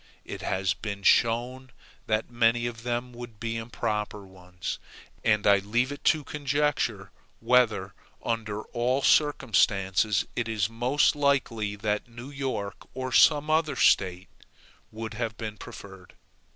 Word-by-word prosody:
It - - -7
has 95 -1 0
been 100 +2 -6
shown 125 +4 +2 0.4
that 110 +2 -1
many 120 0 +2
of 115 -1 -5
them 120 +1 -3
would 120 -3 -10
be 115 0 -3
improper 105 -3 -3
ones. 90 -1 -7 0.4
And 105 -2 +2
I 100 -1 +6
leave 120 +7 0
it 145 - -8
to 155 -1 +3
conjecture, 140 -9 -1 0.3
whether, 115 -7 +2 0.3
under 110 -2 -2
all 125 +3 -1
circumstances, 105 - +2
it 120 -2 -1
is 110 -1 0
most 125 +7 +2
likely 125 -8 0
that 105 +1 -2
New 120 +3 -10
York, 130 -8 -3 0.2
or 130 0 -4
some 150 +3 +5
other 155 -2 +2
State, 90 -6 +2 0.6
would 110 0 -6
have 115 0 -4
been 110 -2 -6
preferred. 95 -2 -11
115 Hz, 135 wpm, -27 LUFS, 105-125 Hz, 0.6 s, I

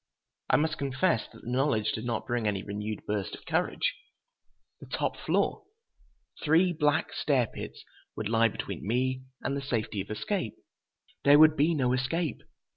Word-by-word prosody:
I - - +5
must 155 +1 +1
confess 140 0 +1
that - - -15
the 120 - -5
knowledge 125 -5 +2
did 110 - -4
not 120 -1 -2
bring 120 -3 -1
any 100 -2 -1
renewed 105 +1 -5
burst 105 -2 -2
of - - -16
courage! 170 +2 0 0.9
The - - -11
top - - -1
floor! 425 - 0 0.8
Three 170 +4 +4
black 150 -1 +1
stair 135 -5 +2
pits - - -8 0.3
would 110 - -3
lie 115 +1 +4
between 100 - -5
me 130 +3 +1 0.2
and 140 - -1
the 140 - -2
safety 110 -6 -2
of 95 - -9
escape. 115 - -2 0.7
There 145 +1 +8
would 155 0 +7
be 155 +4 +3
no 125 -4 +2
escape! 140 +6 -1
130 Hz, 165 wpm, -29 LUFS, 110-150 Hz, 0.9 s, There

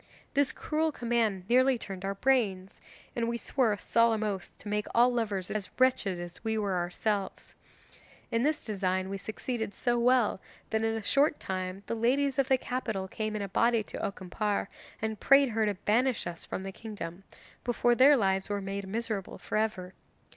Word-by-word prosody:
This 280 -1 +3
cruel 315 +3 -1
command 230 -8 0
nearly 255 +2 +4
turned 195 -4 -7
our 195 0 -2
brains, 195 -6 0 0.3
and 235 -1 0
we 235 - -1
swore 245 -1 +1
a 205 - -1
solemn 230 0 +2
oath 200 -4 -3
to - - -12
make 210 0 -1
all 245 +1 +5
lovers 205 -6 -2
as 205 -3 -3
wretched 250 -8 +2
as 175 +2 -8
we 220 -1 0
were 200 -3 0
ourselves. 190 +3 -2 0.8
In 230 - +2
this 300 +4 0
design 190 -3 -1
we 195 - -3
succeeded 220 0 -4
so 240 -1 +1
well 240 -5 +3 0.3
that 220 0 +1
in 225 0 +1
a 220 - -4
short 285 +7 +3
time 185 +1 -4
the - - -3
ladies 260 +4 +1
of 270 - +3
the 265 - +4
capital 225 -7 -3
came 215 +2 -3
in 210 - -2
a - - -3
body 230 +2 +3
to - - -7
Okimpare, 200 +2 -2 0.3
and 220 -1 -2
prayed 275 0 +6
her 220 -1 +1
to 205 - 0
banish 230 +6 +1
us 170 -1 -6
from 190 - -4
the 195 - -5
kingdom, 195 -4 -7 0.4
before 240 0 +2
their 275 +4 +7
lives 190 -3 +1
were 205 0 -1
made 195 0 -4
miserable 215 -1 -3
for - - -6
ever. 205 -4 -1
215 Hz, 185 wpm, -30 LUFS, 195-240 Hz, 0.8 s, their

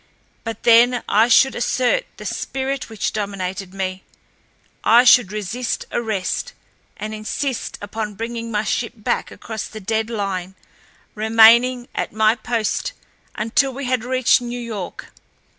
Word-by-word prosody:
But 225 -2 -6
then 240 +1 +5
I 220 +3 +4
should 265 +3 +5
assert 255 - 0
the - - -9
spirit 270 -1 -3
which 220 -2 -3
dominated 195 -2 -4
me, 190 -1 -4 0.8
I 235 +2 +6
should 245 -5 +6
resist 215 +4 -3
arrest, 215 -5 -2 0.4
and 215 +1 -5
insist 225 +4 -3
upon 210 0 -4
bringing 230 +2 -5
my 210 -1 -1
ship 230 +2 -2
back 215 - -2
across 220 -2 -6
the 220 - -9
dead 220 +2 -1
line, 190 -4 -3 0.6
remaining 230 +3 +5
at - - -3
my 220 0 +4
post 230 - -2 0.4
until 245 +5 +1
we 275 0 -5
had 250 -2 0
reached 255 0 +3
New 245 0 -5
York. 220 -6 -7
225 Hz, 135 wpm, -21 LUFS, 210-245 Hz, 0.8 s, I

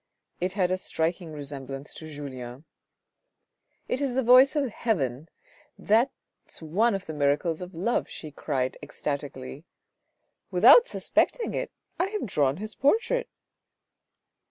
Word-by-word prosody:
It 185 +1 -1
had 185 -3 +1
a 185 - +1
striking 170 -1 -2
resemblance 140 -2 -7
to 160 - -9
Julien. 130 -2 -8 0.6
" - - -49
It 260 - -1
is 270 -3 -1
the 265 - +2
voice 255 +4 +7
of 275 -5 0
heaven. 155 - -2 0.5
That's 230 +6 -1
one 200 +8 +1
of 195 0 -5
the 160 - -6
miracles 150 +3 +1
of 180 0 -8
love," 215 +9 0
she 155 - -8
cried 135 -3 -2
ecstatically; 140 -1 -5 0.4
" - - -51 0.3
Without 485 0 +7
suspecting 485 - 0
it, - - -2 0.3
I 360 - +2
have 420 -4 -3
drawn 145 - +1
his 215 +2 -5
portrait." 460 - +1
170 Hz, 135 wpm, -27 LUFS, 145-235 Hz, 0.6 s, voice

